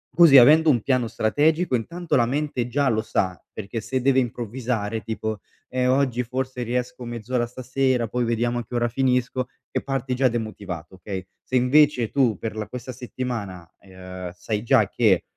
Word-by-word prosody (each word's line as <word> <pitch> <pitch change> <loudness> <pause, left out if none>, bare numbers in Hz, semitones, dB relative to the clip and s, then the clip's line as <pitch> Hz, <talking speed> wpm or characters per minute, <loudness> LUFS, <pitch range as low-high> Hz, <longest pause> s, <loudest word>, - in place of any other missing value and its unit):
così, 165 -5 +8
avendo 155 +6 +7
un 120 -6 +3
piano 130 -2 +1
strategico, 150 +9 +1
intanto 165 +7 -2
la 120 -3 +4
mente 135 -2 -1
già 140 +2 +1
lo 110 -2 +1
sa, 95 -4 -2
perché 110 +2 -5
se 130 +4 -2
deve 130 +1 +3
improvvisare 120 -3 -2
tipo: 110 -1 -4 0.3
"Eh, 125 0 0
oggi 130 -2 +2
forse 130 +1 -4
riesco 125 +1 -3
mezz'ora 120 +1 -2
stasera, 130 0 0
poi 120 +3 -1
vediamo 120 +1 0
a 120 - -6
che 125 - -7
ora 120 0 +2
finisco." 125 0 0 0.3
E - - 0
parti 135 -1 -2
già 130 +1 +3
demotivato, 105 -7 -5
okay, 95 0 -6 0.2
se 130 - -5
invece 125 -1 +4
tu 125 -7 +2
per 110 +2 -5
la 110 - -3
questa 125 +1 -7
settimana, 115 -9 -5
ehm, 95 -1 -9
sai 105 +3 -3
già 115 -4 +4
che, 105 -7 +3
120 Hz, 170 wpm, -24 LUFS, 110-130 Hz, 0.3 s, così